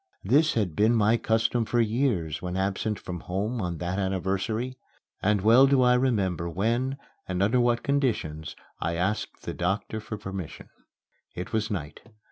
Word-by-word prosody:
This 155 +4 +3
had 100 -8 0
been 110 +6 +4
my 110 +1 +4
custom 115 +1 +1
for 120 +2 0
years 110 - 0
when 90 0 -3
absent 100 +2 -1
from 90 -1 -6
home 105 +8 -2
on 90 -2 -3
that 90 +3 -2
anniversary. 100 +6 -2 0.4
And 105 0 +2
well 115 +6 +7
do 135 -2 +4
I 125 0 +5
remember 100 -10 +1
when, 120 - 0 0.3
and 95 +1 0
under 115 +5 +3
what 120 -1 +2
conditions, 115 - -1 0.2
I 85 +1 -1
asked 95 +5 -2
the - - -4
doctor 95 +5 -2
for 105 0 -6
permission. 95 -5 -7 0.7
It 90 - -6
was 110 -1 0
night. 80 -7 -4
105 Hz, 160 wpm, -27 LUFS, 90-120 Hz, 0.7 s, well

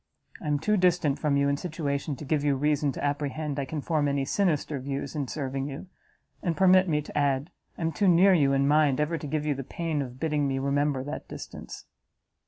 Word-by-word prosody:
I - - -6
am 145 -1 +2
too 210 +8 +1
distant 175 -6 +2
from 145 -2 +1
you 140 0 +2
in 140 0 +1
situation 145 -3 -3
to 150 - -9
give 145 0 0
you 145 -1 +2
reason 145 +1 +1
to - - -6
apprehend 145 0 -2
I 140 - -1
can 150 +2 -4
form 150 -1 0
any 140 -1 0
sinister 155 -4 0
views 140 +2 -4
in 145 -3 -2
serving 135 -1 -3
you; 145 +6 -8 0.5
and, 170 -2 -1
permit 185 -1 +5
me 150 -1 +1
to - - -11
add, 140 +1 +1 0.3
I - - -8
am 165 - +1
too 200 +4 +1
near 185 +2 +6
you 145 -6 +4
in 140 0 +2
mind, 150 -2 +3
ever 155 +2 0
to 150 - -6
give 150 +1 -2
you 150 - +1
the 135 0 -5
pain 160 +2 -2
of 125 -1 -7
bidding 150 -2 0
me 135 -1 -1
remember 140 0 0
that 145 - -6
distance." - - -9
145 Hz, 225 wpm, -27 LUFS, 140-160 Hz, 0.5 s, near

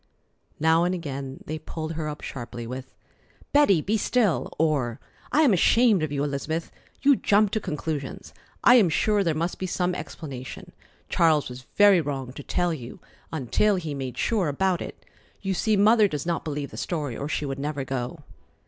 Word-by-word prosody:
Now 160 +2 +4
and 180 +1 +1
again 140 -5 -6
they 155 +1 -4
pulled 155 +1 -5
her 155 -1 -3
up 150 - -7
sharply 120 -2 -6
with: 130 +2 -7 0.6
"Betty, 285 - +5
be 210 +7 0
still!" 215 -3 +1
or 140 -7 +1 0.3
"I 310 - +4
am 260 -8 +5
ashamed 220 +2 +4
of 155 -2 -2
you 140 -1 -1
Elizabeth. 150 +3 -3 0.3
You 280 0 +6
jump 210 -3 +3
to 220 - 0
conclusions. 150 -5 -5 0.3
I 245 - +8
am 200 -7 +5
sure 205 +5 +2
there 165 -4 0
must 170 +3 -2
be 185 - -2
some 180 0 0
explanation. 135 -7 -7 0.4
Charles 155 -5 +3
was 125 +1 -10
very 205 -4 +6
wrong 135 -4 -4
to 145 - -8
tell 175 +4 0
you 125 -6 -8 0.3
until 160 - +1
he 170 -4 -4
had 140 -1 -4
made 130 -2 -5
sure 210 -7 +1
about 180 +5 0
it. - - -8 0.4
You 195 -1 0
see 215 +3 +1
Mother 215 +1 +6
does 150 -5 -4
not 170 -1 -1
believe 145 -2 -4
the - - -9
story, 150 -8 -3
or 140 +5 -4
she 150 - -1
would 135 -1 -4
never 145 -1 -2
go." 130 +4 -4
160 Hz, 185 wpm, -25 LUFS, 140-190 Hz, 0.6 s, I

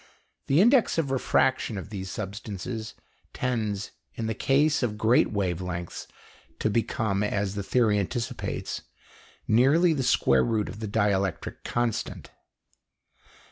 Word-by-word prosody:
The 145 +6 +4
index 240 -1 +4
of 150 -5 0
refraction 130 -3 +1
of 95 +2 -7
these 95 -2 -5
substances 105 +2 -5 0.4
tends 110 -5 -2 0.2
in 115 - -3
the 110 - -1
case 145 +7 +2
of 110 -4 -1
great 110 +3 +3
wave 95 -4 -1
lengths 90 -1 -5 0.5
to 110 - 0
become, 105 -2 0
as 100 -2 -1
the 100 - -3
theory 105 0 +2
anticipates, 115 +4 -3 0.7
nearly 145 +10 +4
the 140 - -1
square 65 - +3
root 110 - 0
of 105 - -8
the 110 - -4
dielectric 100 -3 -1
constant. 120 -2 -2
110 Hz, 130 wpm, -27 LUFS, 100-125 Hz, 0.7 s, The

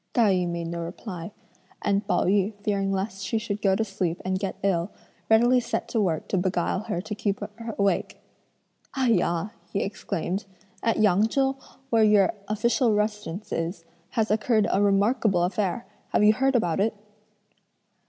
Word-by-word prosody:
Tai 220 -5 +4
yü 180 -1 +1
made 170 0 -3
no 170 +1 -4
reply; 175 +1 -6 0.5
and 200 0 +1
Pao - - +2
yü 200 +2 +2
fearing 195 -2 0
lest 195 0 -3
she 225 - -1
should 210 -2 -3
go 195 -2 +3
to 225 - +1
sleep, 190 -5 -2
and 185 0 0
get 195 -1 -3
ill, 185 -2 +1 0.4
readily 240 +3 +5
set 235 0 -3
to 225 - +1
work 165 -6 -1
to 195 - +1
beguile 180 0 0
her 205 -6 -2
to 210 - -6
keep 205 -1 -1 0.4
awake. 200 -1 0 0.8
"Ai 260 -2 +2
yah!" 175 -2 +1 0.2
he 200 - 0
exclaimed, 190 -1 -3 0.4
"at 230 - +1
Yang 210 0 +4
Chou, 270 +3 +1 0.4
where 225 -1 +5
your 210 -2 +5
official 220 +2 +2
residence 210 -2 -2
is, 165 +1 -3 0.2
has 220 -1 0
occurred 215 0 +2
a 195 - +2
remarkable 200 -1 +3
affair; 195 +4 -1 0.2
have - - +2
you 210 +1 +7
heard 270 +3 +1
about 180 -7 +1
it?" 215 +2 +1
200 Hz, 165 wpm, -26 LUFS, 185-220 Hz, 0.8 s, you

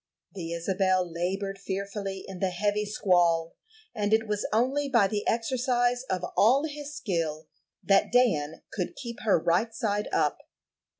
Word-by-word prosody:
The 170 -4 -6
Isabel 185 +1 +1
labored 195 +4 -3
fearfully 195 0 -4
in 190 -2 -8
the 190 - +1
heavy 205 +3 0
squall, 175 -5 +2 0.4
and 210 0 +2
it 220 0 -1
was 210 -1 -1
only 265 +6 +1
by 235 -6 +4
the 205 +1 -2
exercise 245 +1 +1
of 185 -1 -1
all 255 +7 +5
his 295 -1 -7
skill 165 - -2 0.4
that 195 -1 +3
Dan 165 -12 +2
could 180 -5 -3
keep 235 -3 -7
her 210 -5 +3
right 175 +7 +1
side 210 -2 -1
up. - - +1
200 Hz, 145 wpm, -28 LUFS, 180-230 Hz, 0.4 s, all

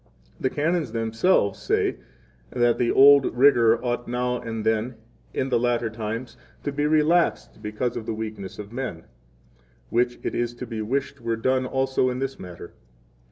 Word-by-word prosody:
16 - - -21
The 130 - +2
Canons 155 -1 0
themselves 115 - +1
say - - 0 0.5
that 120 - +2
the 120 - +2
old 140 -1 +6
rigor 120 -4 +5
ought 120 0 -2
now 125 0 -1
and 115 -2 -5
then, 110 +3 0 0.4
in 135 - -2
the 120 -2 +2
latter 120 -1 0
times, 115 +2 -5 0.3
to 145 - -2
be 145 +1 0
relaxed 155 - +2
because 105 +4 -3
of 110 - -5
the - - -1
weakness 110 -3 -6
of 105 +1 -9
men; 120 -10 -4 0.9
which 120 0 +1
it - - -2
is 120 0 -2
to 125 - -6
be 115 -2 -5
wished 135 +4 -2
were 115 0 -1
done 130 +2 +1
also 130 -1 +1
in 125 - -3
this 135 +1 -4
matter. 90 -1 -10
120 Hz, 170 wpm, -24 LUFS, 110-130 Hz, 0.9 s, old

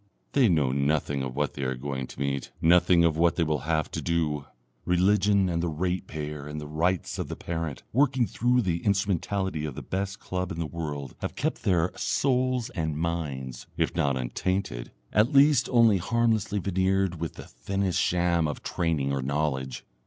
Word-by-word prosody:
They 130 -6 +4
know 75 -7 +2
nothing 70 0 0
of 65 -1 -4
what 75 0 -1
they 70 - -6
are 65 -1 -1
going 65 0 -4
to - - -12
meet, 70 -1 -2
nothing 90 +1 +5
of 80 -2 +2
what 85 +1 +3
they 85 - +2
will 75 -1 -2
have 80 -2 +1
to - - -3
do; 75 -4 0 0.4
Religion 95 +2 +3
and 85 -2 0
the 85 - 0
Ratepayer 75 -3 -3
and 75 +1 -5
the 75 - -6
Rights 80 +4 -1
of - - -2
the - - -5
Parent 80 -4 -4
working 130 -1 +3
through 125 +2 +1
the 85 -3 -1
instrumentality 95 -3 0
of 75 -4 -4
the 75 - -6
Best 95 +1 -3
Club 90 -1 -3
in - - -5
the 85 - -1
World 75 -5 -5
have - - -4
kept - - -2
their 90 -2 +2
souls 130 -2 0
and 80 -4 -2
minds, 75 -6 -3
if - - 0
not 70 -2 +1
untainted, 65 +1 -2 0.2
at 105 +5 +3
least 140 -2 +5
only 115 -5 +5
harmlessly 110 0 +1
veneered, 95 -2 +1
with 85 0 -4
the - - -9
thinnest 95 -2 -2
sham 85 -2 +2
of 75 - -5
training 80 -5 0
or 70 - -1
knowledge. 65 -1 -2
85 Hz, 180 wpm, -27 LUFS, 75-95 Hz, 0.4 s, nothing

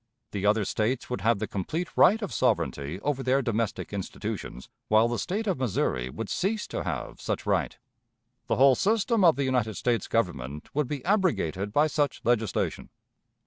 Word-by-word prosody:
The 100 0 -1
other 105 0 +3
States 120 +6 -1
would 125 - -2
have 115 0 +3
the - - -2
complete 155 - -4
right 215 +4 +6
of 200 - -4
sovereignty 70 +6 0
over 145 0 -1
their 135 +1 +2
domestic 115 -3 -2
institutions 95 -9 -5 0.2
while 110 +2 +5
the 120 -2 -2
State 195 - -2
of 190 -9 -1
Missouri 65 - 0
would 100 +11 -5
cease 205 - -1
to - - -3
have - - -5
such - - -3
right. - - 0 0.7
The - - +1
whole 135 0 +6
system 215 - +2
of 165 -3 +6
the 140 - -1
United 125 -5 0
States 120 -5 0
Government 75 - -2
would 150 -2 0
be 140 -1 -5
abrogated 155 - +1
by 145 +7 +4
such 145 -1 0
legislation. 115 -2 0
120 Hz, 175 wpm, -27 LUFS, 100-150 Hz, 0.7 s, right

